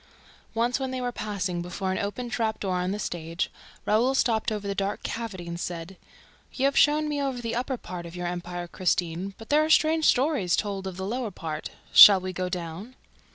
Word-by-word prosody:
Once, 240 +3 +1
when 265 -1 -2
they 260 0 -3
were 245 -1 -2
passing 190 -6 -3
before 185 +2 -3
an 185 - -1
open 205 +5 -3
trapdoor 220 -5 -1
on 180 +1 -1
the 200 - -2
stage, 170 -3 -3 0.3
Raoul 240 +5 +3
stopped 230 -3 +1
over 210 -2 -3
the 200 - -1
dark 195 +1 -2
cavity. 210 -7 -5 1.1
"You 265 - 0
have 275 - +2
shown 300 +1 +4
me 295 -1 -1
over 270 -3 -2
the 230 -1 -3
upper 255 +2 -2
part 175 -5 -7
of 170 - -11
your 180 0 -4
empire, 175 0 -4
Christine, 180 +1 -1
but 225 - -12
there 300 +1 +4
are 310 - -1
strange 315 0 +4
stories 255 - +3
told 195 -2 -3
of 185 -2 -6
the 190 - -4
lower 235 +2 -2
part. 160 -4 -5 0.2
Shall 200 -2 +11
we 185 0 -5
go 185 0 -2
down?" 180 +7 -6
205 Hz, 200 wpm, -26 LUFS, 180-245 Hz, 1.1 s, Shall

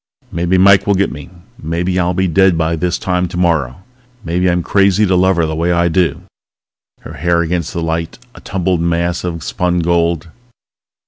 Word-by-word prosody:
Maybe 85 +2 0
Mike 95 +1 +5
will 100 - +3
get 100 +1 0
me. 75 +1 -9 0.3
Maybe 85 +3 -2
I'll 90 0 0
be 95 +1 +1
dead 95 0 +3
by 80 0 0
this 90 +2 -1
time 90 -1 -1
tomorrow. 85 -4 -1 0.4
Maybe 90 +2 0
I'm 90 0 0
crazy 100 +2 +2
to 95 -1 +1
love 95 +1 +3
her 85 -1 +1
the 80 0 -3
way 85 +2 0
I 85 0 +2
do... 85 -2 0 0.8
Her - - -10
hair 85 -1 0
against 85 -1 -2
the 85 -2 -4
light, 80 0 -3 0.2
a - - -14
tumbled 90 -2 -1
mass 85 +1 -1
of 85 -3 -4
spun 90 -1 -1
gold. 85 -1 0
85 Hz, 185 wpm, -15 LUFS, 85-90 Hz, 0.8 s, Mike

